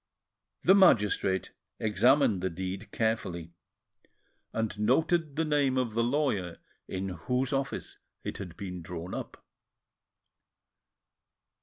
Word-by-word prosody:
The 190 - +7
magistrate 105 - +4 0.3
examined 110 0 +3
the 95 - 0
deed 95 +4 -5
carefully, 90 -7 -1 1.0
and 110 -2 -2
noted 155 +7 +2
the 160 +1 +1
name 145 -3 +2
of 125 -4 0
the 115 - +1
lawyer 120 - 0 0.3
in 95 +1 -3
whose 125 - -1
office 135 0 -3 0.2
it - - -5
had 90 -4 -7
been 90 -2 -6
drawn 85 +1 -6
up. - - -7
110 Hz, 110 wpm, -29 LUFS, 95-135 Hz, 1.0 s, The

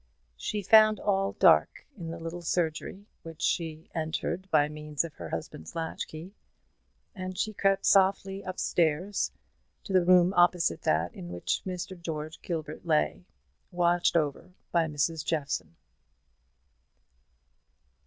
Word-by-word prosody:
She 210 - -3
found 215 +1 +6
all 195 -1 0
dark - - +4
in 170 -6 -7
the 165 - -5
little 165 +1 -6
surgery, 170 +3 -2 0.2
which 165 -1 -9
she 160 -2 -1
entered 170 +3 -3
by 145 -4 +4
means 150 0 -3
of 165 -3 -7
her 85 -8 -8
husband's 80 - -6
latch 165 -1 -3
key; 165 +5 -9 0.8
and 185 -2 -6
she 215 - -1
crept 195 -1 +1
softly 195 0 +3
up 185 -1 -5
the - - -2
stairs 175 +5 +1 0.5
to 195 - -6
the 185 -1 +5
room 180 +1 +5
opposite 175 - +3
that 80 +3 +1
in 85 - -9
which 90 0 -2 0.4
George 155 -2 -5
Gilbert 155 -3 -5
lay, 75 0 0 0.4
watched 175 -1 +2
over 155 +3 -2 0.2
by 170 -2 +3
Mrs. 150 +1 -1
Jeffson. 140 - -2
165 Hz, 135 wpm, -28 LUFS, 150-185 Hz, 0.8 s, found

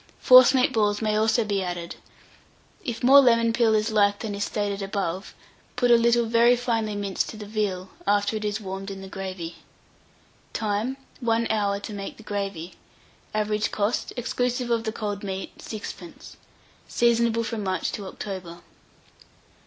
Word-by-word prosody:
Forcemeat 255 0 +7
balls 210 -2 +2
may 215 -1 0
also 220 +2 +2
be 200 -2 -1
added. 175 -2 -4 0.9
If 235 -1 -4
more 270 +3 +8
lemon 230 -3 +3
peel 230 -2 +3
is 215 +1 +1
liked 205 -1 +2
than 220 -3 -4
is 200 0 -2
stated 205 -1 -2
above, 195 -2 -3 0.4
put 245 -1 +2
a - - +9
little 235 0 +3
very 235 +2 +4
finely 225 -4 -1
minced 200 -2 -2
to 220 - -8
the 210 - -7
veal, 200 -3 -2 0.2
after 205 +1 +2
it 215 - -3
is 210 0 -1
warmed 195 -1 -6
in 195 -1 -7
the - - -8
gravy. 185 -3 -6 1.0
Time. 220 +5 -1 0.2
1 230 -2 +1
hour 200 -2 0
to 210 - -7
make 200 -1 -6
the 220 - -13
gravy. 195 -5 -4 0.6
Average 210 0 0
cost, 210 +2 -1
exclusive 245 0 -1
of 230 0 +1
the 220 - -1
cold 210 -2 -4
meat, 190 -1 -5
6d. 200 -5 -8 0.5
Seasonable 235 -1 +2
from 225 -2 -4
March 185 -3 -1
to 200 -2 -6
October. 185 -4 -7
210 Hz, 160 wpm, -25 LUFS, 195-230 Hz, 1.0 s, a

